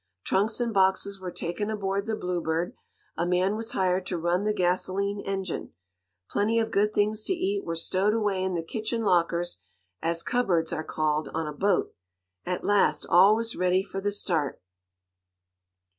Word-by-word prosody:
Trunks 210 +5 +1
and 235 -2 -1
boxes 195 0 +2
were 185 -1 -5
taken 175 +4 -3
aboard 200 -1 -2
the 220 - 0
Bluebird, 175 -3 -2 0.4
a - - -1
man 180 +3 +1
was 225 +1 -4
hired 185 0 +1
to 180 - -2
run 175 +4 0
the 210 - +2
gasoline 195 +1 0
engine. 195 - -4 0.5
Plenty 220 +3 +1
of 225 -1 +1
good 210 0 +2
things 215 +1 +1
to - - +1
eat 385 +3 -1
were 165 - -3
stowed 190 +5 +1
away 205 -4 0
in 190 -1 -1
the 165 - -2
kitchen 220 +6 -2
lockers, 175 -2 +1 0.4
as 165 0 0
cupboards 180 -10 +1
are 155 - -2
called 155 -2 -1
on 160 0 -1
a 150 - -4
boat. 195 +7 +1 0.5
At 180 0 -2
last 205 -1 +3
all 190 +4 +7
was 225 0 -2
ready 185 +1 +2
for 195 -1 -6
the 205 +1 0
start. 170 -8 -1
190 Hz, 170 wpm, -27 LUFS, 175-210 Hz, 0.5 s, all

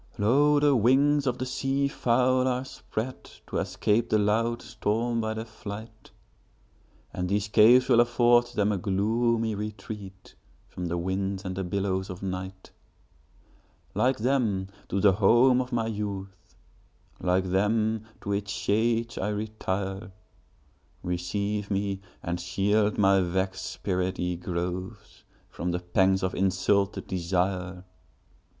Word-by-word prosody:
Lo! 145 +8 +4
the 145 -1 +4
wings 135 +5 +3
of 125 -1 0
the 130 - -3
sea 135 +2 0
fowl 130 -1 +2
are 125 0 0
spreadTo 130 -1 -6
escape 105 +5 0
the 110 - +3
loud 115 +3 +1
storm 115 0 -1
by 110 0 -2
their 110 +1 -4
flight; 110 0 -9 1.0
And 90 0 -3
these 100 +1 0
caves 120 +5 +6
will 120 -3 +5
afford 120 0 +4
them 105 -3 0
a 100 - -1
gloomy 110 +4 +1
retreatFrom 100 -3 -8
the 85 +1 -2
winds 95 +2 -2
and 95 0 -3
the 95 - -2
billows 95 +1 -2
of 95 +1 -8
night; 95 0 -6 1.2
Like 130 +1 +2
them, 110 -6 0 0.2
to 100 - 0
the 100 0 +6
home 120 +6 +4
of 125 +1 -6
my 115 -2 0
youth, 100 -4 -6 0.6
Like 90 0 0
them, 110 +3 +1 0.2
to 100 - -4
its 100 0 -2
shades 115 +3 0
I 105 - -1
retire; 100 -2 -3 0.9
Receive 100 +4 -2
me, 100 -1 -1 0.2
and 85 0 -2
shield 105 +4 +1
my 95 -1 +4
vexed 95 +1 -2
spirit, 95 -1 -2
ye 90 0 -1
groves, 90 +1 -5 0.3
From 90 - -3
the 90 0 -1
pangs 95 +2 +2
of 95 - -1
insulted 95 +1 +1
desire! 90 0 -2
100 Hz, 130 wpm, -27 LUFS, 95-115 Hz, 1.2 s, caves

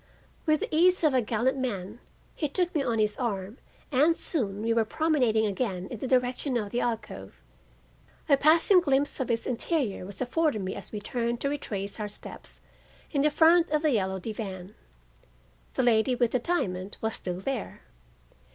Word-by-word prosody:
With 310 -1 +3
the - - -2
ease 360 +2 +4
of 305 -3 +4
a 255 - +3
gallant 240 +4 0
man 210 -4 -4 0.3
he 300 - -2
took 350 +4 -1
me 300 - +1
on 240 -4 0
his 210 -1 +1
arm 210 -1 -3 0.3
and 300 +5 +4
soon 210 - -2
we 230 0 +2
were 230 -1 +3
promenading 245 -4 +1
again 195 -3 -2
in 240 - -6
the 265 - -3
direction 250 +1 +1
of 205 -3 -3
the 245 - 0
alcove. 230 -2 -4 0.9
A 285 - +6
passing 325 +6 +5
glimpse 285 -4 +1
of 260 - -2
its 230 -1 0
interior 250 - -1
was 200 -1 -9
afforded 260 -3 0
me 185 - -3
as - - -8
we 210 - -4
turned 235 +2 -2
to 280 - +1
retrace 205 -8 -4
our 210 - -2
steps 205 - -9 0.5
in 290 0 +3
front 330 +3 +5
of 305 +1 0
the 305 - +3
yellow 190 -5 0
divan. 195 -2 -6 1.0
The - - +1
lady 240 +1 +3
with 240 -2 +1
the 255 - +1
diamond 195 - -2
was 220 0 -2
still 180 -1 -4
there. 250 +2 -4
245 Hz, 180 wpm, -28 LUFS, 210-290 Hz, 1.0 s, A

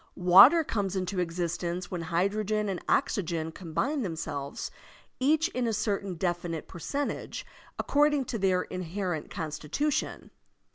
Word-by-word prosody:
Water 195 - +8
comes 200 - -2
into 185 0 -2
existence 175 +1 -2
when 180 -2 -3
hydrogen 200 +5 0
and 185 -3 -2
oxygen 170 - 0
combine 195 - -2
themselves, 160 - -4 0.5
each 305 +5 +3
in 250 -8 -1
a 225 - 0
certain 200 -3 -1
definite 175 -2 -2
percentage, 285 - -4 0.3
according 290 -1 +2
to 230 - -3
their 185 -2 +2
inherent 180 -2 -4
consti 155 -2 -5
tution. 295 - -1
185 Hz, 125 wpm, -29 LUFS, 170-225 Hz, 0.5 s, Water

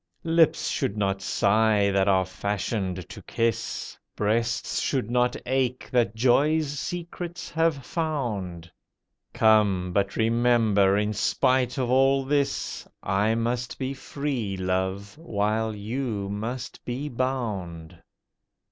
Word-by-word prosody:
Lips 165 -1 +3
should 100 - -1
not 95 -1 0
sigh 100 +1 +3
that 95 0 +2
are 95 -2 +3
fashioned 95 -1 -3
to - - -10
kiss— 115 -1 -2 0.2
Breasts 115 +3 0
should 125 -5 -1
not 125 0 +2
ache 130 -1 0
that 120 -4 +2
joy's 145 +6 +3
secrets 175 0 -5
have 160 -4 +1
found. 105 - -3 0.6
Come! 100 -5 +3
but 100 0 0
remember, 115 -4 +3
in 105 +1 0
spite 125 +4 +1
of 125 -2 0
all 135 +1 +4
this, 140 0 -1 0.2
I 105 +4 +1
must 120 +1 -2
be 135 0 -3
free, 135 -7 -3
Love, 95 +4 -2
while 110 -5 -1
you 105 -1 -3
must 115 +4 -5
be 130 +4 -4
bound. 110 - -3
115 Hz, 115 wpm, -26 LUFS, 100-130 Hz, 0.6 s, all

